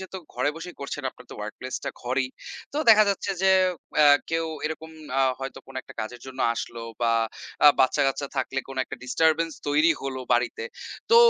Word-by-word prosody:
যেহেতু 190 Hz, 0 st, -7 dB, 0.2 s
ঘরে 130 Hz, +4 st, +1 dB
বসেই 175 Hz, +2 st, -8 dB
করছেন, 140 Hz, +1 st, -4 dB
আপনার 125 Hz, -, -17 dB
তো -, -, -8 dB
ওয়ার্ক 105 Hz, 0 st, -5 dB
প্লেসটা 130 Hz, 0 st, -4 dB
ঘরেই। 130 Hz, +1 st, 0 dB, 0.4 s
তো 290 Hz, -, -1 dB
দেখা 215 Hz, -1 st, +8 dB
যাচ্ছে 200 Hz, 0 st, -1 dB
যে, 190 Hz, -, +5 dB, 0.5 s
অ্যা 145 Hz, -1 st, +8 dB
কেউ 165 Hz, 0 st, 0 dB, 0.2 s
এরকম 160 Hz, +1 st, -6 dB, 0.3 s
আ -, -, +4 dB, 0.2 s
হয়তো 135 Hz, 0 st, -5 dB
কোন 135 Hz, -, -13 dB
একটা -, -, -14 dB
কাজের 120 Hz, +3 st, -6 dB
জন্য 130 Hz, -1 st, -8 dB
আসলো 115 Hz, 0 st, -5 dB, 0.2 s
বা 115 Hz, -1 st, +3 dB, 0.5 s
আ -, -, +12 dB
বাচ্চা-কাচ্চা 135 Hz, +1 st, +2 dB
থাকলে 135 Hz, +1 st, -1 dB
কোন 135 Hz, -, -8 dB
একটা -, -, -7 dB
ডিস্টারবেন্স 160 Hz, +4 st, +2 dB, 0.2 s
তৈরি 150 Hz, +3 st, +5 dB
হলো 135 Hz, -1 st, -3 dB
বাড়িতে। 120 Hz, -, +1 dB, 0.5 s
তো 465 Hz, -, +8 dB
140 Hz, 180 wpm, -26 LUFS, 130-165 Hz, 0.5 s, আ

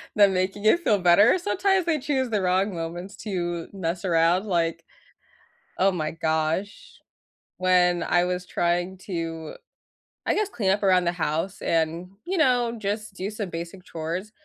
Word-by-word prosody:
them 200 Hz, -2 st, +5 dB
making 185 Hz, +2 st, -1 dB
it 280 Hz, +11 st, +5 dB
feel 215 Hz, -, +2 dB
better. 185 Hz, -, +5 dB
Sometimes 385 Hz, 0 st, +1 dB
they 325 Hz, -3 st, +1 dB
choose 265 Hz, -2 st, -1 dB
the 210 Hz, -3 st, 0 dB
wrong 190 Hz, +2 st, +1 dB
moments 175 Hz, +4 st, -6 dB
to 175 Hz, -5 st, -3 dB
mess 175 Hz, -1 st, -3 dB
around, 170 Hz, +2 st, +3 dB
like, 170 Hz, -4 st, -1 dB, 0.9 s
oh 195 Hz, +1 st, +4 dB
my 155 Hz, -4 st, -2 dB
gosh. 165 Hz, -, -2 dB, 0.6 s
When 180 Hz, -1 st, +3 dB
I 175 Hz, 0 st, +2 dB
was 180 Hz, 0 st, -3 dB
trying 175 Hz, +2 st, -1 dB
to, 165 Hz, -3 st, -4 dB, 0.7 s
I -, -, +2 dB
guess, 425 Hz, -1 st, 0 dB
clean 210 Hz, -, -1 dB
up 205 Hz, +1 st, 0 dB
around 185 Hz, -2 st, +4 dB
the 170 Hz, -, +1 dB
house 165 Hz, +3 st, -2 dB
and, 165 Hz, +2 st, 0 dB, 0.2 s
you 375 Hz, +2 st, -2 dB
know, 245 Hz, -6 st, +2 dB
just 210 Hz, 0 st, -3 dB
do 190 Hz, +2 st, -4 dB
some 210 Hz, -3 st, -5 dB
basic 170 Hz, +2 st, -7 dB
chores, 170 Hz, +6 st, -5 dB
185 Hz, 160 wpm, -25 LUFS, 170-210 Hz, 0.9 s, them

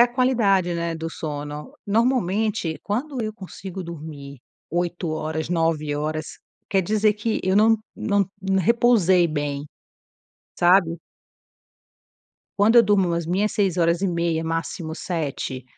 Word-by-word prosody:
a 245 Hz, -, +4 dB
qualidade, 210 Hz, -9 st, +2 dB
né, 170 Hz, 0 st, -2 dB
do 165 Hz, 0 st, -4 dB
sono, 150 Hz, -1 st, -6 dB
normalmente 215 Hz, -5 st, +1 dB
quando 250 Hz, +5 st, -2 dB
eu 215 Hz, 0 st, -3 dB
consigo 190 Hz, -2 st, -8 dB
dormir 150 Hz, -4 st, -8 dB, 0.3 s
8 175 Hz, 0 st, -2 dB
horas, 155 Hz, 0 st, -3 dB
9 165 Hz, -3 st, 0 dB
horas 155 Hz, +1 st, -2 dB, 0.4 s
quer 195 Hz, -1 st, +2 dB
dizer 210 Hz, +3 st, +2 dB
que 215 Hz, +1 st, -2 dB
eu 190 Hz, +1 st, +2 dB
não 220 Hz, +1 st, +5 dB, 0.2 s
não 200 Hz, -3 st, +1 dB, 0.3 s
repousei 190 Hz, -4 st, +4 dB
bem, 145 Hz, -2 st, -3 dB, 0.9 s
sabe. 175 Hz, -1 st, +4 dB, 1.6 s
Quando 220 Hz, +4 st, +5 dB
eu 235 Hz, -, +9 dB
durmo 195 Hz, -4 st, +2 dB
as 170 Hz, -1 st, -2 dB
minhas 195 Hz, +5 st, +1 dB
6 195 Hz, -4 st, 0 dB
horas 170 Hz, 0 st, +2 dB
e 195 Hz, -, +1 dB
meia 170 Hz, -2 st, 0 dB
máximo 165 Hz, 0 st, -3 dB
7, 145 Hz, -7 st, -4 dB
175 Hz, 130 wpm, -23 LUFS, 160-205 Hz, 1.6 s, eu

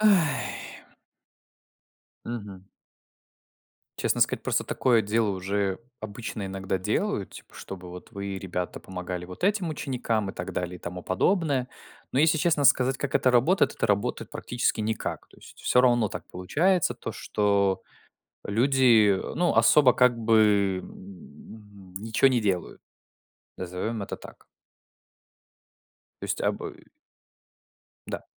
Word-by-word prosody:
Ай. 190 Hz, -9 st, +2 dB, 1.6 s
Мгм. 100 Hz, -5 st, -7 dB, 1.3 s
Честно -, -, 0 dB
сказать, -, -, +2 dB
просто -, -, 0 dB
такое 120 Hz, -3 st, +2 dB
дело 110 Hz, +1 st, +1 dB
уже 95 Hz, 0 st, -1 dB, 0.2 s
обычно 110 Hz, -1 st, -5 dB
иногда 95 Hz, 0 st, -3 dB
делают, 95 Hz, -, -1 dB
типа -, -, -13 dB
чтобы 90 Hz, -2 st, -9 dB
вот 90 Hz, 0 st, -10 dB
вы, 100 Hz, -2 st, -5 dB
ребята, 90 Hz, -2 st, -4 dB
помогали 90 Hz, -1 st, -6 dB
вот 90 Hz, -, -6 dB
этим 200 Hz, -3 st, +1 dB
ученикам 120 Hz, -8 st, -2 dB
и -, -, -13 dB
так 90 Hz, +1 st, -6 dB
далее, 90 Hz, 0 st, -3 dB
и -, -, -15 dB
тому 90 Hz, +1 st, -7 dB
подобное. 140 Hz, -, +1 dB, 0.4 s
Но 130 Hz, -, 0 dB
если 155 Hz, +2 st, +4 dB
честно 155 Hz, -2 st, +2 dB
сказать, 130 Hz, -1 st, +4 dB
как 140 Hz, -, -3 dB
это 130 Hz, -, +4 dB
работает- 130 Hz, +11 st, +3 dB
это -, -, 0 dB
работает 100 Hz, +4 st, -1 dB
практически 120 Hz, -2 st, -1 dB
никак. 110 Hz, +1 st, -3 dB
То -, -, -21 dB
есть -, -, -16 dB
всё 125 Hz, -, +4 dB
равно 120 Hz, -3 st, +3 dB
так 90 Hz, -, -7 dB
получается, 155 Hz, -, +1 dB
то 115 Hz, -1 st, -6 dB
что 100 Hz, -3 st, +1 dB, 0.6 s
люди, 120 Hz, -1 st, +4 dB
э, 95 Hz, -, -2 dB
ну, 175 Hz, 0 st, +2 dB
особо 135 Hz, -5 st, +6 dB
как 125 Hz, -2 st, +4 dB
бы, 105 Hz, -4 st, +3 dB
м, 95 Hz, +2 st, -13 dB
ничего 110 Hz, +5 st, +3 dB
не 125 Hz, -3 st, +2 dB
делают. 95 Hz, -4 st, -2 dB, 0.8 s
Назовём 95 Hz, +5 st, -3 dB
это 100 Hz, -, -5 dB
так. -, -, -14 dB, 1.8 s
То -, -, -4 dB
есть -, -, -2 dB
а -, -, +2 dB
бы -, -, -8 dB, 1.2 s
Да. -, -, -5 dB
110 Hz, 135 wpm, -26 LUFS, 95-125 Hz, 1.8 s, особо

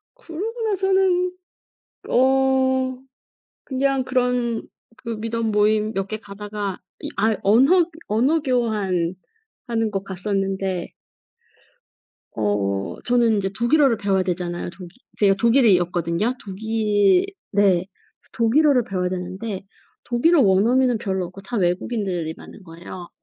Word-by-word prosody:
그러고 450 Hz, +1 st, -6 dB
나서는 380 Hz, -2 st, +1 dB, 0.7 s
어 260 Hz, 0 st, +2 dB, 0.7 s
그냥 270 Hz, -1 st, 0 dB
그런 250 Hz, -3 st, 0 dB, 0.3 s
그 245 Hz, -2 st, -8 dB
Meetup 230 Hz, 0 st, -2 dB
모임 215 Hz, +1 st, +2 dB
몇 195 Hz, 0 st, -1 dB
개 215 Hz, +1 st, -4 dB
가다가 205 Hz, -1 st, -6 dB, 0.2 s
이 -, -, -4 dB
아 220 Hz, +1 st, +2 dB
언허 270 Hz, -, +5 dB, 0.2 s
언어 260 Hz, +10 st, +2 dB
교환하는 210 Hz, -9 st, 0 dB, 0.8 s
곳 195 Hz, -1 st, -3 dB
갔었는데 195 Hz, -1 st, -2 dB, 1.4 s
어 100 Hz, -2 st, -1 dB
저는 240 Hz, -2 st, +3 dB
인제 195 Hz, -2 st, -1 dB
독일어를 240 Hz, +1 st, +3 dB
배워야 195 Hz, -3 st, +1 dB
되잖아요. 175 Hz, -1 st, -3 dB
독일 180 Hz, 0 st, -11 dB, 0.3 s
제가 195 Hz, -2 st, +4 dB
독일이었거든요. 190 Hz, -, +2 dB
독일 210 Hz, -, +2 dB, 0.3 s
네. 205 Hz, 0 st, +3 dB, 0.6 s
그래서 -, -, -29 dB
독일어를 250 Hz, +2 st, +3 dB
배워야 185 Hz, -2 st, -2 dB
되는데 185 Hz, +3 st, -5 dB, 0.4 s
독일어 290 Hz, +7 st, +3 dB
원어민은 235 Hz, +5 st, +3 dB
별로 190 Hz, -4 st, -2 dB
없고 185 Hz, +3 st, -11 dB
다 235 Hz, +5 st, -5 dB
외국인들이 180 Hz, -3 st, -1 dB
많은 205 Hz, -, -13 dB
거예요. 175 Hz, +1 st, -10 dB
215 Hz, 270 characters per minute, -22 LUFS, 190-255 Hz, 1.4 s, 언허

